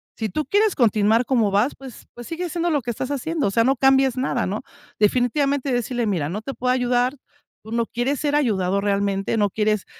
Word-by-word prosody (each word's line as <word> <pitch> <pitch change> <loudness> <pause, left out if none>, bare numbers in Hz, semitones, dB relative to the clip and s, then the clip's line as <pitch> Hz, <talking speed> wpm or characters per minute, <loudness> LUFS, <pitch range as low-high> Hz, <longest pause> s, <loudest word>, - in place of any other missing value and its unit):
si 220 -1 -3
tú 300 +11 -2
quieres 415 0 +2
continuar 220 0 +3
como 230 -6 +2
vas, 210 +8 +2
pues 265 -3 -12
pues 240 -1 -10
sigue 345 +2 -4
haciendo 345 +1 -1
lo 295 -4 +1
que 240 - -3
estás 255 +4 -4
haciendo, 290 -1 -1
o - - -1
sea 230 +3 +3
no 265 +3 +2
cambies 270 0 +3
nada, 255 -2 0
¿no?, 200 +3 -3 0.4
definitivamente 265 +5 +1
decirle: 245 0 -1
"Mira, 170 -8 -1
no 205 +6 -4
te 275 - -5
puedo 250 -1 -1
ayudar, 250 +1 +1 0.5
tú 220 - -11
no 235 0 0
quieres 255 +4 -2
ser 295 -1 0
ayudado 200 -8 +1
realmente, 200 +1 0
no 205 -1 +2
quieres 215 0 0
245 Hz, 210 wpm, -22 LUFS, 210-270 Hz, 0.5 s, continuar